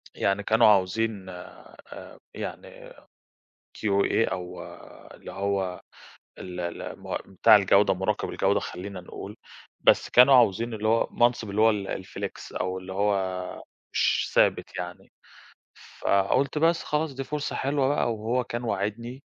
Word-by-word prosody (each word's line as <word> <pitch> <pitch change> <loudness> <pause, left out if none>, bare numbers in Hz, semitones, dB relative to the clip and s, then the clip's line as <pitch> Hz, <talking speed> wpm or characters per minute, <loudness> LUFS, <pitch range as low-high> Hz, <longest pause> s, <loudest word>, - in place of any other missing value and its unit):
يعني 100 +1 0
كانوا 110 +2 +4
عاوزين 100 0 +1
آآ، 90 -1 -12
يعني - - -8 0.9
QA، 100 +2 +1
أو 90 -1 -6 0.5
اللي - - -11
هو 95 -2 -2 0.6
ال 90 -1 -7
ال 85 -1 -5
م - - -4
بتاع 105 +3 +6
الجودة، 100 0 +4
مراقب 95 +3 -2
الجودة - - +1
خلينا 95 +1 -7
نقول. 95 +3 -9 0.4
بس - - +4
كانوا 125 +2 +7
عاوزين 115 -1 +3
اللي 110 0 -2
هو 115 +1 +2
منصب 120 -3 +1
اللي 100 +2 -1
هو 110 +1 +6
ال 100 -2 -3
الflex، - - -7
أو 95 0 -2
اللي 95 0 -8
هو 95 -2 -1 0.3
مش - - +1
ثابت - - +2
يعني. 90 0 -7 0.9
فقُلت 100 +9 +1
بس 165 +2 +2
خلاص 150 -1 -1
دي 135 - -4
فرصة 150 +2 -4
حلوة 140 0 0
بقى، 140 -4 +1
وهو 115 +4 -1
كان 120 +1 -5
واعدني 115 +4 -3
105 Hz, 135 wpm, -26 LUFS, 95-120 Hz, 0.9 s, كانوا